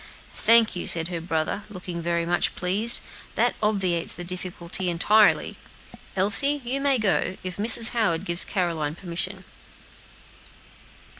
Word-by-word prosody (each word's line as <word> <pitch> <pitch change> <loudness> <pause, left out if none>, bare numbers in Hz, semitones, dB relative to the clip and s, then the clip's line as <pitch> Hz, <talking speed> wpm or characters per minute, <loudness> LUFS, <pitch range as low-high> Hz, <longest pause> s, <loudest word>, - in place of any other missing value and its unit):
"Thank 230 -2 +3
you," 175 - -5
said 165 0 0
her 170 -2 -5
brother, 165 +3 -3
looking 180 -3 -8
very 170 0 -2
much 175 +1 -1
pleased; 205 +6 +3 0.3
"that - - +1
obviates 190 -6 -1
the 175 - -6
difficulty 180 0 -3
entirely. 205 +5 +2 0.6
Elsie, 210 +10 +3
you 265 +3 -2
may 275 -1 +2
go, 195 -3 -1
if 185 -1 -6
Mrs. 225 +2 +6
Howard 200 -7 -1
gives 170 -1 +3
Caroline 165 -6 -3
permission." 185 +2 -6
185 Hz, 130 wpm, -23 LUFS, 170-215 Hz, 0.6 s, Mrs